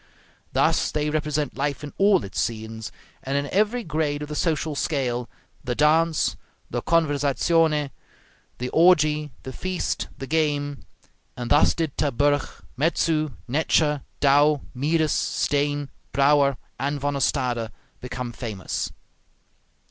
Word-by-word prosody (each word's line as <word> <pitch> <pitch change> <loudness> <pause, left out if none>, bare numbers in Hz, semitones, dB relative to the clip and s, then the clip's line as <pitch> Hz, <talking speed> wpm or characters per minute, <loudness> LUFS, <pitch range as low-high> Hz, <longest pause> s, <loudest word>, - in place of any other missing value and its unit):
Thus - - +2
they 150 0 -1
represent 150 -1 -1
life 145 +1 -2
in 145 - -7
all 195 -2 +5
its 95 - -5
scenes, 110 -1 -3 0.3
and 135 +1 -2
in 140 - 0
every 215 +5 +1
grade 155 -3 -1
of 150 - -7
the 150 - -4
social 160 -1 0
scale 125 -5 -1 0.3
the 125 -2 -2
dance, 160 +2 +3 0.4
the - - -1
conversazione, 150 -1 +2 0.7
the 125 +1 -3
orgie, 155 -3 +4
the 130 - -7
feast, 185 +4 -2
the 135 - -5
game; 145 -2 0 0.6
and 120 -1 -5
thus 145 - +5
did 160 -5 -2
Terburg, 145 0 +1 0.3
Metzu, 155 0 +1
Netscher, 150 +1 +2 0.2
Dow, 145 +1 +4
Mieris, 155 +4 +1
Steen, 145 -1 0 0.2
Brouwer, 140 -1 +4 0.2
and 140 +1 -1
Van 145 +1 -1
Ostade 125 -5 0 0.3
become 125 -1 -5
famous. 110 -6 -4
145 Hz, 125 wpm, -24 LUFS, 135-155 Hz, 0.7 s, all